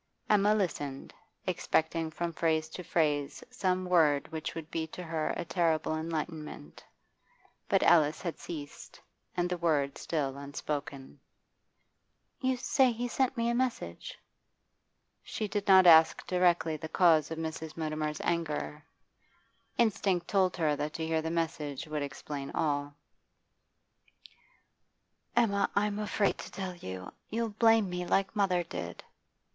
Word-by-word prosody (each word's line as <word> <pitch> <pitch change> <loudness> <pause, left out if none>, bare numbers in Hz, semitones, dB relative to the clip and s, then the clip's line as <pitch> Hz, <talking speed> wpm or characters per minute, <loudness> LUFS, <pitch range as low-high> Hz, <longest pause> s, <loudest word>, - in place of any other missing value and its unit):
Emma 210 0 +4
listened, 145 -9 -3 0.3
expecting 160 0 0
from 170 +1 -3
phrase 160 -1 +1
to 180 - -7
phrase 150 - 0
some 185 -6 0
word 155 -6 +3
which 160 -1 -4
would 165 -1 -7
be 160 -1 -2
to 180 +3 -8
her 160 -2 -2
a 175 - -3
terrible 165 -3 +1
enlightenment 155 - -5 0.9
But - - +3
Alice 155 -3 +5
had 170 -3 -5
ceased, 145 -4 -8 0.4
and 175 0 +2
the 180 -1 -3
word 145 -5 +1
still 140 -4 -2
unspoken. 140 -1 -5 1.2
'You 260 -1 +1
say 260 +1 +3
he 240 +2 -3
sent 260 +1 0
me 230 0 +1
a 235 - +2
message?' 240 - -2 1.0
She 215 - -4
did 205 0 -3
not 190 -1 +8
ask 160 -1 +7
directly 175 -3 +2
the 160 +1 -7
cause 160 -3 +4
of 160 - -5
Mrs. 160 0 -5
Mutimer's 155 -1 -2
anger. 155 -2 -2 0.9
Instinct 200 -6 +1
told 190 -3 +2
her 155 -3 +2
that 150 +1 -3
to 160 - -2
hear 160 0 0
the 160 - -3
message 160 -4 -2
would 155 -1 -3
explain 140 0 -5
all 145 -2 +1
else. 145 - -16 2.4
'Emma, 205 -4 +3
I'm 205 0 +1
afraid 210 -1 0
to - - -7
tell 190 -2 -5
you. 95 - -7 0.2
You'll 230 +1 -1
blame 225 0 +4
me, 180 0 -3
like 195 +2 +1
mother 185 -4 +2
did. 90 - -7
165 Hz, 140 wpm, -30 LUFS, 150-190 Hz, 2.4 s, not